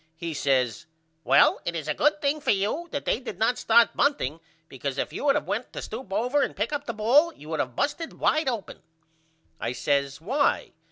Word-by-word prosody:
He 165 0 -5
says 130 -6 0 0.4
Well - - +5
it 170 - -3
is 155 -3 -4
a 150 - +1
good 300 - +1
thing 290 +2 +1
for - - -3
you 210 - 0
that 285 - -4
they - - +1
did 255 - -7
not 235 +3 +1
start 230 +1 +4
bunting 220 - +1 0.3
because 135 0 -5
if - - -2
you 290 - -3
had 275 - +5
of - - 0
went 225 +4 -3
to - - -5
stoop 220 -2 -7
over 250 +8 +1
and - - -1
pick 210 +8 -2
up 290 0 -3
the 235 - -2
ball 265 +10 +4
you 150 - -13
would 160 -2 -2
of 125 -4 -2
busted 295 - -2
wide 310 -3 +1
open. 230 -6 -5 0.8
I 120 - -2
says 140 0 0
Why? 270 - 0
220 Hz, 215 wpm, -26 LUFS, -, 0.8 s, Well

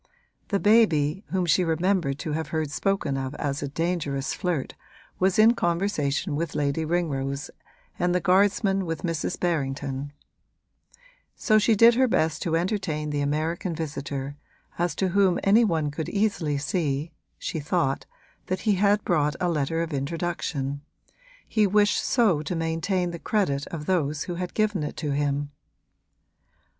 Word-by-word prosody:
The 200 - 0
Baby, 195 -6 +3
whom 185 -2 0
she 175 +2 +3
remembered 170 -3 +1
to 155 - -2
have 160 0 -2
heard 155 -1 -2
spoken 160 -4 0
of 135 +1 -4
as 145 -2 -2
a 145 - -2
dangerous 145 -3 -2
flirt, 175 -8 -2 0.5
was 190 0 +2
in 220 +2 +7
conversation 170 - 0
with 165 +1 -3
Lady 145 +2 0
Ringrose 145 -4 -2 0.5
and 180 0 +1
the - - +3
guardsman 195 0 +2
with 165 -1 -4
Mrs. 165 -3 -2
Berrington; 140 -4 -2 1.2
so 215 -2 +3
she 220 +1 +3
did 230 +3 +7
her 260 +2 +3
best 160 -8 +1
to 165 -1 0
entertain 165 -4 -1
the 145 -1 -1
American 160 +4 -1
visitor, 145 -3 -4 0.4
as 175 0 0
to 190 - 0
whom 190 -1 +3
any 210 +4 +5
one 160 -8 0
could 155 +2 -4
easily 200 -8 0
see 150 0 -1 0.3
(she 160 - -4
thought) 145 -2 -1 0.4
that 185 - -2
he 215 - +2
had 205 +1 +3
brought 150 -4 +1
a 180 - +1
letter 165 +1 0
of 165 -2 -5
introduction 140 -1 -3 0.7
he 215 -2 +2
wished 205 +1 +3
so 210 - +3
to 175 +3 -3
maintain 165 +3 -1
the 170 - -7
credit 145 -11 0
of 155 -3 -6
those 150 -5 0
who 175 - -5
had 180 0 -5
given 210 -5 +1
it 150 - -4
to 150 -2 -2
him. 145 0 -1
165 Hz, 155 wpm, -25 LUFS, 145-190 Hz, 1.2 s, in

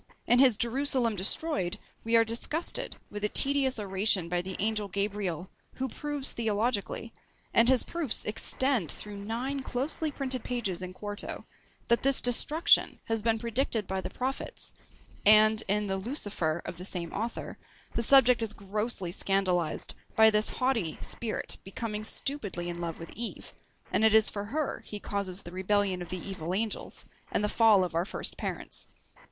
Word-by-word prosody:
In 245 - +4
his 255 -5 +6
Jerusalem 245 -1 +2
Destroyed 195 - 0 0.3
we 230 +1 +1
are 230 0 +6
disgusted 235 +9 -1 0.2
with 205 0 -6
a 210 - +2
tedious 275 0 +3
oration 195 -3 0
by 175 0 0
the 185 +1 -5
angel 210 0 -1
Gabriel, 200 -3 -3 0.2
who 265 - -2
proves 290 +2 -1
theologically, 225 0 -1 0.4
and 230 +1 +6
his 260 -2 +4
proofs 325 -8 -1
extend 230 - 0
through 205 -1 -5
nine 250 +6 -3
closely 275 +5 -2
printed 265 -3 -2
pages 210 -8 -2
in 185 0 -5
quarto, 205 +2 -6 0.4
that 235 - +3
this 275 0 +6
destruction 295 +7 +4
has 225 -1 -1
been 225 +1 +2
predicted 235 -1 0
by 190 0 -3
the - - -5
prophets; 260 +2 -4 0.5
and, 215 +1 +7
in 210 +1 +1
the 195 -1 -1
Lucifer 190 - -2
of 175 - -6
the 180 - -7
same 175 -4 -4
author, 230 +3 -5 0.3
the - - 0
subject 250 -1 +6
is 220 -2 -1
grossly 200 -2 -2
scandalised 180 -4 +1 0.2
by 220 0 +7
this 210 0 +5
haughty 235 -11 -1
spirit 230 -2 -4
becoming 210 +2 -5
stupidly 205 -8 -3
in 175 0 -5
love 165 -1 -4
with 165 - -9
Eve, 235 +1 -6 0.4
and - - +1
it 220 0 +5
is 220 -1 +5
for 200 0 -4
her 290 +6 -3
he 210 - -5
causes 200 -2 -2
the 175 - -8
rebellion 190 0 +1
of 175 - -7
the 185 - -2
evil 185 -2 -4
angels, 220 +1 -3 0.3
and - - 0
the - - +2
fall 215 -3 +5
of 180 - -4
our 165 +1 +1
first 190 - -1
parents. - - -5
215 Hz, 165 wpm, -29 LUFS, 190-245 Hz, 0.5 s, and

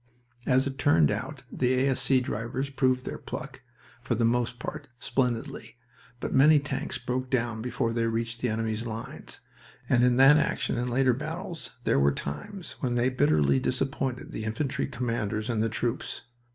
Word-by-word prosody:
As 130 +1 +4
it 135 0 -4
turned 75 - +4
out, - - -4
the 125 0 +1
A.S.C. 130 0 +3
drivers 125 +4 -3
proved 130 -2 +1
their - - -5
pluck, - - -7 0.4
for 120 0 -1
the 115 +1 +2
most 120 +1 +1
part, 145 +4 -6
splendidly, 120 -2 -2 0.4
but - - -3
many 150 +3 +7
tanks 140 -1 -3
broke 125 +1 -3
down 120 -4 0
before 120 -1 -1
they 115 0 +1
reached 115 +1 -2
the 125 - +1
enemy's 110 +1 -2
lines, 115 0 -7 0.5
and 125 -2 +4
in 125 -1 +4
that 135 +4 +8
action 150 - 0
and 125 +1 -1
later 130 +1 +3
battles 165 - -5
there - - +3
were 70 +1 +4
times 75 - -6
when 125 -2 -1
they 120 +1 +3
bitterly 75 - +3
disappointed 130 - -2
the 110 - -5
infantry 115 +6 -1
commanders 115 -3 -2
and 110 -2 0
the 115 - +1
troops. 120 +3 -3
125 Hz, 165 wpm, -28 LUFS, 115-135 Hz, 0.5 s, that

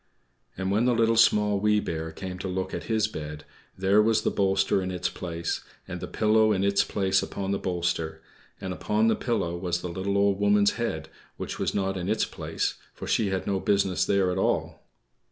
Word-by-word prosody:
And 95 +1 -1
when 110 +4 +2
the 125 -1 +3
Little, 115 0 +3
Small, 105 -2 +4
Wee 105 +1 +3
Bear 80 -4 -4
came 90 +2 -7
to 95 - -4
look 95 0 -3
at - - -4
his 110 -2 +1
bed, 75 -6 -7 0.3
there 95 +3 +4
was 110 0 +2
the - - +1
bolster 95 0 +2
in 90 - -3
its 90 -1 -2
place, 85 -1 -4 0.2
and - - -5
the - - -5
pillow 110 0 +3
in 95 -2 +1
its 100 0 +3
place 95 -1 +1
upon 95 0 -4
the 100 - 0
bolster; 85 -3 -2 0.4
and 95 -1 -4
upon 105 +4 +1
the - - +3
pillow 85 -8 -1
was 85 0 -2
the 90 - -4
little 95 +3 -2
Old 100 -1 +2
Woman's 100 0 +4
head, 80 -10 -3 0.3
which - - -5
was - - -1
not 95 -1 0
in 90 +1 -3
its 110 - +2
place, - - -3 0.2
for - - -7
she 110 - +1
had 95 -1 -2
no 100 -1 0
business 100 -2 +1
there 95 -2 +2
at 90 - -2
all. - - 0
95 Hz, 210 wpm, -27 LUFS, 90-105 Hz, 0.4 s, Small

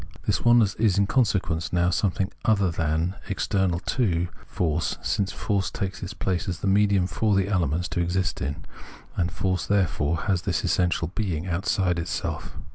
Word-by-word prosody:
This - - 0
oneness 120 -4 +5
is 105 -4 +3
in 100 - +4
consequence 95 -9 +1
now 90 0 +2
something 95 0 0
other 100 -5 +3
than, 80 +2 0 0.2
external 95 -2 0
to, 90 -8 0 0.2
force, 80 -2 -1
since 100 -1 0
force 100 -3 -1
takes 95 -1 -4
its 95 +3 -6
place 95 -3 -1
as 90 - -4
the - - -3
medium 100 -1 +3
for 105 +2 +1
the 95 0 +2
elements 90 -3 0
to - - -2
exist 90 +2 -1
in; 70 +1 -4 0.5
and 85 -2 0
force 95 +1 -1
therefore 85 -6 +1
has 95 -4 0
this - - -1
its - - +1
essential 85 -2 +1
being 90 -7 -2
outside 90 0 0
itself. 85 0 -4
95 Hz, 170 wpm, -25 LUFS, 85-100 Hz, 0.5 s, oneness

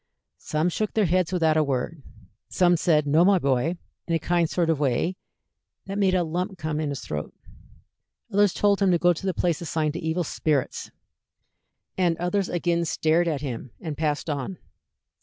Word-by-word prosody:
Some 155 +3 0
shook 215 +4 -2
their 215 -2 +3
heads 180 +1 +1
without 160 -4 +2
a 155 - +4
word; 140 +3 -2 0.5
some 175 -1 +3
said, 155 -3 +2
"No, 155 +4 +4
my 195 +1 +5
boy," 140 +3 0 0.3
in 165 - +1
a - - +4
kind 170 -1 +1
sort 170 -2 +1
of 155 - -1
way 145 +6 0 0.7
that 195 +1 -4
made 190 -2 +3
a 180 - +2
lump 180 +4 -3
come 155 -2 -3
in 155 -2 -1
his 140 -2 -4
throat; 75 0 -5 1.0
others 205 -1 +4
told 205 +1 +2
him 195 - +4
to 175 - +4
go 175 +1 +4
to 175 - -8
the 190 - +1
place 170 -3 0
assigned 155 -2 -1
to 170 - -4
evil 160 +2 -1
spirits; 150 -3 -1 1.1
and 175 -3 +2
others 180 +2 -1
again 170 -1 0
stared 165 +1 +1
at 150 -4 -1
him 130 -3 -5
and 155 -3 -5
passed 150 0 -1
on. 150 +4 -3
165 Hz, 185 wpm, -25 LUFS, 155-180 Hz, 1.1 s, my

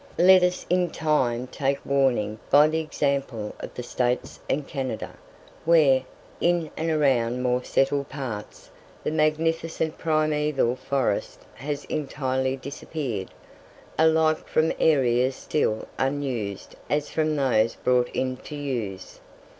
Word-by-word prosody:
Let 185 +1 +7
us 180 0 0
in 180 0 +2
time 130 -7 0
take 135 +1 -1
warning 125 -6 +1
by 150 +1 +7
the 160 +1 0
example 140 -8 -2
of - - -8
the 125 - -5
States 125 0 -1
and 145 -1 -1
Canada, 130 -5 -4 0.5
where, 150 -6 +5 0.4
in 170 -3 +1
and 160 +1 -2
around 135 -7 +2
the 125 - -3
more 125 0 +1
settled 140 +2 +1
parts, 125 -7 -7 0.3
the - - -1
magnificent 160 +1 0
primeval 150 -5 +1
forest 130 -6 -1
has 145 +3 -5
entirely 130 -3 -1
disappeared, 130 - -5 0.7
alike 160 0 +3
from 155 +1 +2
areas 130 -4 +3
still 110 -8 -1
unused 130 -8 -2
as 145 0 0
from 155 -1 +1
those 120 -6 +2
brought 125 -1 +2
into 130 +3 -3
use. 120 -10 -4
140 Hz, 125 wpm, -25 LUFS, 125-155 Hz, 0.7 s, Let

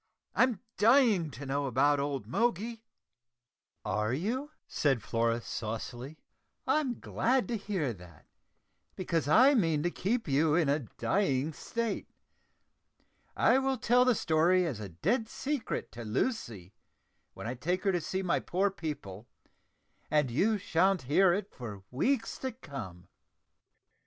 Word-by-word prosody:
I'm 250 -6 +2 0.2
dying 220 - +5
to 140 +2 -9
know 140 +1 -1
about 140 +3 +3
old 140 -1 -2
Moggy." 230 +2 -1 1.0
"Are 105 +2 0
you?" 240 - -2 0.2
said 135 -8 +1
Flora 115 0 0
saucily. 120 +7 -5 0.5
"I'm 275 -6 0
glad 255 +2 0
to 235 - 0
hear 190 - -2
that, 90 -5 -15 0.7
because 170 -5 -1
I 255 - +6
mean 165 - +2
to 175 - 0
keep 225 +8 -1
you 150 +2 +3
in 165 -4 +2
a 145 +2 +2 0.2
dying 155 -6 +1
state. 230 +5 -3 1.3
I 260 - +4
will 270 0 0
tell 245 +1 +4
the 250 -2 +3
story 175 +2 +3
as 135 -10 -3
a 105 -2 -6
dead 220 - -1
secret 280 -2 -3
to 120 - -8
Lucy, 110 - -3 0.6
when - - -8
I 120 - -2
take 175 +9 -2
her 195 - +3
to 175 -2 0
see 190 +4 -3
my 180 - +1
poor 195 +3 0
people, 120 - -6 0.8
and 150 -4 +2
you 210 - +2
sha'n't 185 -1 +1
hear 175 +8 +4
it 200 +3 -2
for 105 -6 -8
weeks 230 - 0
to 260 - -3
come." 100 - -9
165 Hz, 140 wpm, -30 LUFS, -, 1.3 s, I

